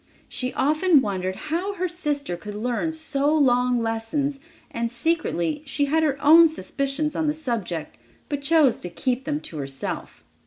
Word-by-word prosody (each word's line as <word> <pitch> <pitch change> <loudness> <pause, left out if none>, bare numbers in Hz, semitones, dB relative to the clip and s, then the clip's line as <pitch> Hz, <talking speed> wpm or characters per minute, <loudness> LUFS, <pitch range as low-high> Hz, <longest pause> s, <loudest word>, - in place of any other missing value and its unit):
She 255 0 -3
often 310 +3 +4
wondered 190 -5 -2
how 345 - -3
her 365 0 -1
sister 295 - -2
could 205 +4 -8
learn 245 +8 -1
so 300 -2 0
long 250 -4 +3
lessons, 230 +6 -1 0.3
and, 235 0 -2
secretly, 245 - -1
she 285 +1 0
had 315 +3 +2
her 290 -3 +1
own 330 +3 +9
suspicions 285 +2 -2
on 320 - 0
the 300 - +1
subject, 225 - -4 0.3
but 290 -2 -3
chose 290 -3 +4
to 180 - -5
keep 245 +10 -2
them 300 0 -1
to 160 - -7
herself. 135 -1 -5
275 Hz, 160 wpm, -24 LUFS, 230-310 Hz, 0.3 s, own